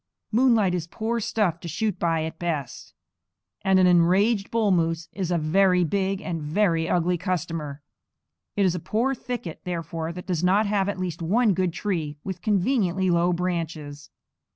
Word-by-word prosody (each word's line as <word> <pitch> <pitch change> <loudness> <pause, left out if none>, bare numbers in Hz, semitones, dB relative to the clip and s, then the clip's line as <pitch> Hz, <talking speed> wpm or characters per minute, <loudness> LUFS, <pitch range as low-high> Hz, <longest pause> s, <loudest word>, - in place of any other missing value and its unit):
Moonlight 225 -5 +3
is 175 -2 -2
poor 225 +6 -2
stuff 200 -6 0
to 170 - -8
shoot 205 +5 -2
by 165 -2 +1
at 160 +1 -6
best, 150 -8 -4 0.7
and 190 0 +3
an 185 - +5
enraged 190 +5 +3
bull 225 -3 +1
moose 165 -1 0
is 190 -4 -3
a 175 - +1
very 180 +3 +3
big 195 +3 0
and 170 -3 -3
a - - -6
very 165 0 +1
ugly 175 0 +1
customer. 160 -5 -3 0.7
It 200 - +2
is 180 - +2
a 180 - -3
poor 235 +10 0
thicket, 245 -10 -6
therefore, 165 -2 -4
that 180 +1 -8
does 180 -3 -2
not 195 +4 +3
have 200 -1 +1
at 200 - -3
least 175 -2 -4
one 210 +6 +3
good 185 -1 0
tree 165 -5 -3
with 185 -2 -5
conveniently 190 -2 +1
low 170 +1 +3
branches. 165 -5 -3
180 Hz, 175 wpm, -25 LUFS, 165-200 Hz, 0.7 s, an